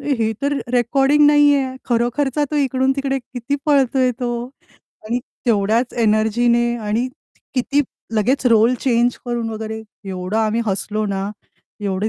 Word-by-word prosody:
हे 250 Hz, -6 st, 0 dB
तर 285 Hz, +1 st, +1 dB
रे 285 Hz, -, -1 dB
रेकॉर्डिंग 270 Hz, +4 st, +3 dB
नाहीये, 290 Hz, -1 st, +5 dB, 0.2 s
खरोखरचा 250 Hz, +4 st, 0 dB
तो 300 Hz, -, -1 dB
इकडून 265 Hz, -1 st, +2 dB
तिकडे 270 Hz, -1 st, -1 dB
किती 250 Hz, +1 st, -5 dB
पळतोय 265 Hz, -3 st, +3 dB
तो 245 Hz, -, -1 dB, 0.8 s
आणि 235 Hz, +3 st, 0 dB, 0.3 s
तेवढ्याच 225 Hz, +2 st, +1 dB
एनर्जीने 225 Hz, +2 st, +3 dB, 0.2 s
आणि 220 Hz, +4 st, 0 dB, 0.5 s
किती 275 Hz, +3 st, +1 dB, 0.4 s
लगेच 255 Hz, +5 st, +1 dB
रोल 225 Hz, +3 st, +5 dB
चेंज 240 Hz, -1 st, +1 dB
करून 240 Hz, -2 st, -2 dB
वगैरे, 220 Hz, 0 st, -5 dB, 0.2 s
एवढं 185 Hz, +1 st, -4 dB
आम्ही 220 Hz, +1 st, +1 dB
हसलो 210 Hz, +2 st, -1 dB
ना, 195 Hz, 0 st, -2 dB, 0.5 s
एवढी 200 Hz, +1 st, -1 dB
240 Hz, 135 wpm, -20 LUFS, 220-270 Hz, 0.8 s, नाहीये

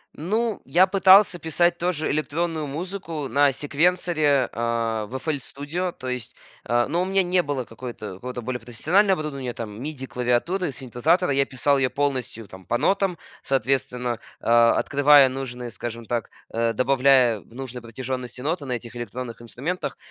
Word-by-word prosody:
Ну, 215 Hz, +7 st, -1 dB
я 185 Hz, +2 st, +5 dB
пытался 190 Hz, -1 st, +6 dB
писать 175 Hz, +2 st, +1 dB
тоже 170 Hz, -3 st, -1 dB
электронную 155 Hz, +1 st, -1 dB
музыку 165 Hz, -1 st, -5 dB
на 145 Hz, 0 st, +4 dB
секвенсоре, 150 Hz, -1 st, +1 dB
а, 115 Hz, -2 st, -1 dB
в 130 Hz, -, -8 dB
FL 145 Hz, +2 st, -2 dB
Studio, 160 Hz, +8 st, -4 dB
то 130 Hz, -, -9 dB
есть, 125 Hz, -2 st, -4 dB, 0.3 s
э, 120 Hz, 0 st, +3 dB
но 170 Hz, +4 st, 0 dB
у -, -, 0 dB
меня 195 Hz, 0 st, +2 dB
не 180 Hz, 0 st, +2 dB
было 140 Hz, -5 st, -3 dB
какой-то, 115 Hz, -4 st, -8 dB
какого-то 125 Hz, +4 st, -6 dB
более 125 Hz, 0 st, -3 dB
профессионального 165 Hz, -, +2 dB
оборудования, 135 Hz, -5 st, -4 dB
там, 110 Hz, 0 st, -7 dB
миди 140 Hz, -2 st, -5 dB
клавиатуры, 135 Hz, +8 st, 0 dB
синтезатора. 140 Hz, +7 st, +1 dB
Я 135 Hz, 0 st, +3 dB
писал 140 Hz, +1 st, +1 dB
её 130 Hz, -, +2 dB
полностью 130 Hz, -6 st, -2 dB
там 95 Hz, 0 st, -13 dB
по 120 Hz, -, 0 dB
нотам, 190 Hz, +4 st, +1 dB, 0.2 s
соответственно, 125 Hz, -3 st, -1 dB, 0.2 s
э, -, -, -16 dB
открывая 135 Hz, +4 st, +5 dB
нужные, 125 Hz, -2 st, -6 dB
скажем 115 Hz, -1 st, -6 dB
так, 120 Hz, -2 st, -2 dB, 0.2 s
э, 115 Hz, 0 st, +1 dB
добавляя 130 Hz, -3 st, +4 dB
в 115 Hz, -, -19 dB
нужной 130 Hz, -2 st, -6 dB
протяжённости 125 Hz, +1 st, -5 dB
ноты 155 Hz, +1 st, -2 dB
на 125 Hz, -, -2 dB
этих 120 Hz, 0 st, -6 dB
электронных 120 Hz, 0 st, -6 dB
инструментах. 140 Hz, +10 st, -4 dB
135 Hz, 160 wpm, -24 LUFS, 120-165 Hz, 0.3 s, пытался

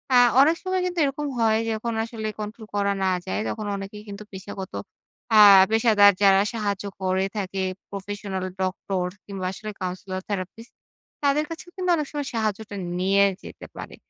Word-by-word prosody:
আ -, -, +8 dB, 0.2 s
অনেক 315 Hz, +4 st, +5 dB
সময় 370 Hz, -1 st, 0 dB
কিন্তু 360 Hz, -1 st, -2 dB
এরকম 285 Hz, +2 st, -2 dB
হয় 220 Hz, -1 st, +3 dB
যে, -, -, 0 dB
যখন 230 Hz, +1 st, -3 dB
আসলে 225 Hz, -2 st, -5 dB
control 215 Hz, +1 st, -7 dB
করা 200 Hz, 0 st, +1 dB
না 190 Hz, -, +2 dB, 0.2 s
যায়, 95 Hz, +2 st, -1 dB
তখন 210 Hz, -, -4 dB
অনেকেই 200 Hz, +2 st, -8 dB
কিন্তু 200 Hz, +1 st, -7 dB
পেশাগত 190 Hz, 0 st, -8 dB, 0.6 s
আ -, -, +9 dB, 0.3 s
পেশাদার 220 Hz, -3 st, +6 dB
যারা 195 Hz, -1 st, +6 dB
সাহায্য 205 Hz, -3 st, -2 dB, 0.2 s
করে 190 Hz, 0 st, +1 dB
থাকে 195 Hz, -1 st, -3 dB, 0.3 s
professional 200 Hz, -1 st, -4 dB, 0.2 s
ডক্টর 185 Hz, 0 st, -1 dB, 0.2 s
কিংবা, 195 Hz, -2 st, -5 dB
আসলে 215 Hz, +2 st, -7 dB
counsellor 185 Hz, +1 st, -4 dB
therapist 205 Hz, +4 st, -5 dB, 0.5 s
তাদের 285 Hz, +2 st, +2 dB
কাছেও 330 Hz, +2 st, -8 dB
কিন্তু 365 Hz, -1 st, -2 dB
অনেক 300 Hz, -3 st, -2 dB
সময় 290 Hz, -2 st, -3 dB
সাহায্যটা 215 Hz, -1 st, -2 dB, 0.2 s
নিয়ে 195 Hz, +2 st, +4 dB, 0.2 s
যেতে -, -, -10 dB
পারে। -, -, -8 dB
205 Hz, 160 wpm, -24 LUFS, 195-230 Hz, 0.6 s, আ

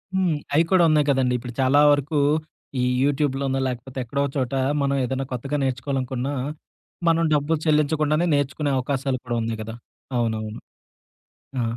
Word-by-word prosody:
హ్మ్. 180 Hz, -5 st, +2 dB, 0.2 s
అయి 160 Hz, -, +5 dB
కూడా 185 Hz, -2 st, +5 dB
ఉన్నాయి 150 Hz, -1 st, +3 dB
కదండీ. 130 Hz, -2 st, +2 dB
ఇప్పుడు 120 Hz, 0 st, -8 dB
చాలా 130 Hz, +2 st, +4 dB
వరకు 145 Hz, +1 st, +1 dB, 0.6 s
ఈ -, -, +1 dB, 0.2 s
యూట్యూబ్లున్న 140 Hz, -1 st, 0 dB
లేకపోతే 125 Hz, +1 st, -6 dB
ఎక్కడో 140 Hz, +4 st, -1 dB
చోట, 130 Hz, -1 st, -1 dB, 0.3 s
మనం 140 Hz, 0 st, +1 dB
ఏదైనా 135 Hz, +2 st, -2 dB
కొత్తగా 135 Hz, +4 st, -2 dB
నేర్చుకోవాలనుకున్నా, 130 Hz, 0 st, -2 dB, 0.8 s
మనం 165 Hz, 0 st, +3 dB
డబ్బులు 150 Hz, +2 st, +2 dB
చెల్లించకుండానే 155 Hz, +1 st, +2 dB
నేర్చుకునే 145 Hz, +1 st, 0 dB
అవకాశాలు 135 Hz, 0 st, -1 dB
కూడా 120 Hz, -1 st, -2 dB
ఉన్నాయి 115 Hz, -1 st, -3 dB
గదా! 110 Hz, +1 st, -7 dB, 0.4 s
అవునవును. 110 Hz, -2 st, -2 dB, 1.0 s
ఆ! 120 Hz, -, +1 dB
135 Hz, 140 wpm, -23 LUFS, 125-145 Hz, 1.0 s, అయి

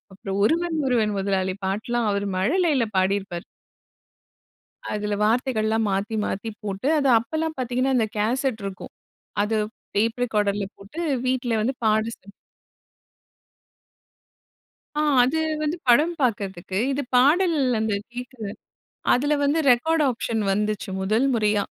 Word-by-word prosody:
அப்புறம் 195 Hz, 0 st, -5 dB
ஒருவன் 335 Hz, +6 st, +1 dB
ஒருவன் 225 Hz, -5 st, +2 dB
முதலாளி 190 Hz, -1 st, 0 dB
பாட்டெல்லாம் 225 Hz, +4 st, -1 dB
அவர் 200 Hz, 0 st, -1 dB
மழலையில 290 Hz, -, +2 dB
பாடியிருப்பார். 190 Hz, -2 st, 0 dB, 1.5 s
அதில 210 Hz, 0 st, -1 dB
வார்த்தைகள்லாம் 225 Hz, -1 st, +1 dB
மாத்தி 200 Hz, +3 st, -1 dB
மாத்தி 225 Hz, +3 st, -3 dB
போட்டு 200 Hz, +5 st, -3 dB
அது 280 Hz, -2 st, +2 dB
அப்போலாம் 315 Hz, +7 st, -3 dB
பார்த்தீங்கன்னா 255 Hz, +1 st, 0 dB
அந்த 225 Hz, -2 st, +2 dB
கேசெட் 245 Hz, +1 st, 0 dB
இருக்கும் 195 Hz, -1 st, -7 dB, 0.5 s
அது 220 Hz, +1 st, 0 dB, 0.4 s
டேப் 225 Hz, +4 st, +1 dB
ரெக்கார்டர்ல 205 Hz, -3 st, 0 dB
போட்டு 200 Hz, +12 st, -9 dB, 0.3 s
வீட்டில 250 Hz, -3 st, 0 dB
வந்து 255 Hz, +5 st, 0 dB
பாட 215 Hz, 0 st, +3 dB, 0.2 s
சி 195 Hz, -, -23 dB, 2.7 s
ஆ -, -, +2 dB, 0.2 s
அது 275 Hz, +6 st, +1 dB, 0.2 s
வந்து 305 Hz, +2 st, -1 dB
படம் 300 Hz, +8 st, +5 dB
பார்க்கறதுக்கு 195 Hz, -6 st, -1 dB
இது 285 Hz, +1 st, -1 dB
பாடல் 320 Hz, +6 st, +4 dB, 0.2 s
அந்த 220 Hz, 0 st, 0 dB, 0.2 s
கேக்கற, 250 Hz, -1 st, -8 dB, 0.7 s
அதில 290 Hz, +4 st, +2 dB
வந்து 285 Hz, +3 st, +2 dB
ரெக்கார்ட் 315 Hz, +6 st, +3 dB
ஆப்ஷன் 230 Hz, -2 st, -2 dB
வந்துச்சு 210 Hz, -1 st, -1 dB
முதல் 220 Hz, +7 st, +2 dB
முறையா 210 Hz, -2 st, +2 dB
225 Hz, 120 wpm, -24 LUFS, 205-265 Hz, 2.7 s, படம்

